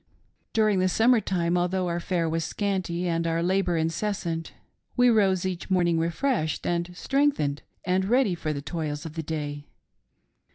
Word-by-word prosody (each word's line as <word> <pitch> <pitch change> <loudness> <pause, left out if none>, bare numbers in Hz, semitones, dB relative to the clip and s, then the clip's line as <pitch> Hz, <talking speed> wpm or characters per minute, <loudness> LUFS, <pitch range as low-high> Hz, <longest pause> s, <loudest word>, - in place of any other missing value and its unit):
During 215 -3 +3
the 185 0 +2
summer 230 +5 +4
time, 175 -3 0
although 180 +1 0
our 170 0 -1
fare 170 -1 -1
was 165 0 -1
scanty 180 -1 -2
and 165 0 0
our 165 0 0
labor 180 -1 +1
incessant, 165 0 -2 0.5
we 245 0 +6
rose 190 -5 +3
each 185 -1 -4
morning 175 -3 +2
refreshed 170 - -1
and 170 0 0
strengthened 270 - +1 0.2
and 185 +1 +1
ready 240 -1 +3
for 160 -2 -3
the 140 -2 -4
toils 150 -1 -4
of 160 - -6
the 165 - -3
day. 145 -2 -5
175 Hz, 160 wpm, -26 LUFS, 165-190 Hz, 0.5 s, we